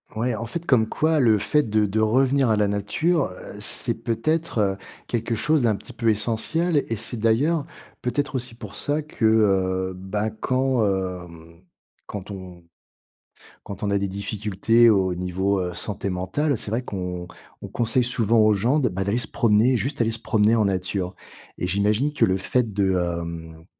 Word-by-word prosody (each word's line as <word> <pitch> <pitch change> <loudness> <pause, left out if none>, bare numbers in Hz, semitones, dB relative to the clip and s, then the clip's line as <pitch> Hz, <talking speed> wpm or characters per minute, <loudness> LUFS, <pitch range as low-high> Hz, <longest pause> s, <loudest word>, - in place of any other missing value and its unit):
Ouais, 115 +1 0
en 115 - -4
fait 170 +9 -5
comme 110 -7 +3
quoi 155 +4 +1
le 115 -5 +4
fait 150 +9 +2
de 110 -2 +1
de 105 +2 -1
revenir 130 +3 +3
à 110 - +4
la 105 -1 +2
nature, 140 - +1
heu, 90 - -10
c'est - - -2
peut-être 115 -5 -1 0.3
quelque 115 -1 -1
chose 150 +2 +1
d'un 110 -3 +3
petit - - -11
peu 115 - -3
essentiel 120 +11 0
et 115 - 0
c'est 115 +3 -6
d'ailleurs 135 +9 +2 0.4
peut-être 140 +2 -2
aussi 125 -2 -4
pour 105 -4 -10
ça 150 +1 -1
que, 150 -6 -3
heu, 95 -4 +2
bah, 95 +4 -3
quand, 130 +3 0
hem, 90 -4 -4 0.5
quand 100 0 -7
on 90 -3 -9 1.0
quand 100 0 -8
on 100 - 0
a 100 - +2
des 100 0 -1
difficultés 105 +3 +2
au 95 -4 +2
niveau, 95 +2 -1
heu, 90 -1 -2
santé 100 +2 -1
mentale, 95 - -1
c'est 105 - -5
vrai 115 +3 0
qu'on 90 -6 -5 0.3
on - - -6
conseille 120 +1 +1
souvent 115 -2 +2
aux 110 0 +5
gens 120 +9 +2
de, 130 - +2
bah, 95 -1 -2
d'aller 100 +4 0
se 120 -4 -1
promener. 115 +4 +3
Juste 125 +4 -2
aller 115 -1 +2
se 115 - -3
promener 110 -1 +2
en 110 - +3
nature, 95 -1 -1 0.4
et 90 - -2
j'imagine 105 +9 +1
que - - +1
le 95 0 +3
fait 110 +5 0
de 100 -1 +1
hem, 85 -2 -4
110 Hz, 180 wpm, -24 LUFS, 95-125 Hz, 1.0 s, aux